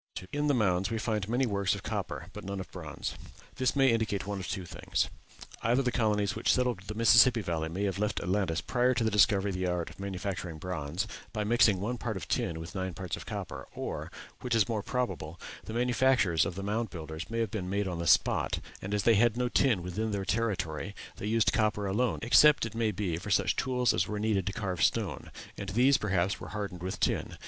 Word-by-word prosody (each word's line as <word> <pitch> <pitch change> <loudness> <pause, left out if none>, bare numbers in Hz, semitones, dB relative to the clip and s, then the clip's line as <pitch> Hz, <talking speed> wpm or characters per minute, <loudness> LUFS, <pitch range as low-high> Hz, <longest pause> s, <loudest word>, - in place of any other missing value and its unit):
In 145 +1 0
the 145 - +3
mounds 95 -4 +2
we 115 - -1
find 105 -2 -2
many 125 +3 +2
works 100 -4 +1
of - - -8
copper - - -3
but - - -8
none 100 0 -4
of 95 - -7
bronze. 80 -6 -5 0.4
This 130 +1 +1
may 135 -2 +5
indicate 110 -3 0
one 100 0 -3
of 95 - -5
two 95 -3 -3
things: - - -2 0.5
either 120 +4 +2
the 125 - +1
colonies 105 -4 +1
which - - +2
settled 125 -5 +1
the 105 - -5
Mississippi 115 +1 +6
Valley 80 -4 -2
may 95 +5 -3
have 100 -1 -1
left 105 0 0
Atlantis 90 -2 0
prior 125 0 +1
to 120 - +1
the 110 - +1
discovery 100 -1 +4
of - - -4
the 90 0 -1
art 90 -2 -2
of 85 - -17
manufacturing 95 -3 -4
bronze, 85 0 -3 0.3
by 105 -1 -2
mixing 105 -3 +4
one 115 +5 -3
part 110 -4 -3
of 90 - -7
tin 80 -1 -1
with 80 - -8
nine 95 -3 -3
parts 90 -5 -4
of - - -10
copper, - - -6
or, - - -4 0.3
which 125 -2 -1
is 110 -3 +4
more 110 -3 -1
probable, 100 -10 -3 0.3
the 110 - -6
manufactures 120 -8 +3
of 90 - -5
the 95 - -5
Mound 110 +2 -1
Builders 80 0 -7
may 115 - -3
have 115 -3 0
been 95 -4 -3
made 100 +1 0
on 90 -2 -3
the 85 - -2
spot; 80 - +3 0.2
and 100 +2 -2
as 105 - 0
they 115 - +5
had 115 +2 +3
no 125 0 +1
tin 120 -8 +2
within 100 +5 -2
their 100 -2 -2
territory 95 -3 -1 0.2
they 105 - -4
used 115 0 +3
copper 105 -4 +1
alone, 110 +6 +1
except, 145 +3 +6
it 110 - -6
may 115 -1 +1
be, 95 -5 -2
for 85 - -7
such - - +2
tools 125 -2 +1
as 90 +2 +1
were 105 - -3
needed 105 -3 0
to - - 0
carve 95 -4 -3
stone, - - 0 0.3
and 100 - -5
these, 125 +6 +4
perhaps, 95 -2 0
were - - -8
hardened 100 -4 -5
with 95 +1 -4
tin. - - 0
105 Hz, 225 wpm, -30 LUFS, 90-115 Hz, 0.5 s, Mississippi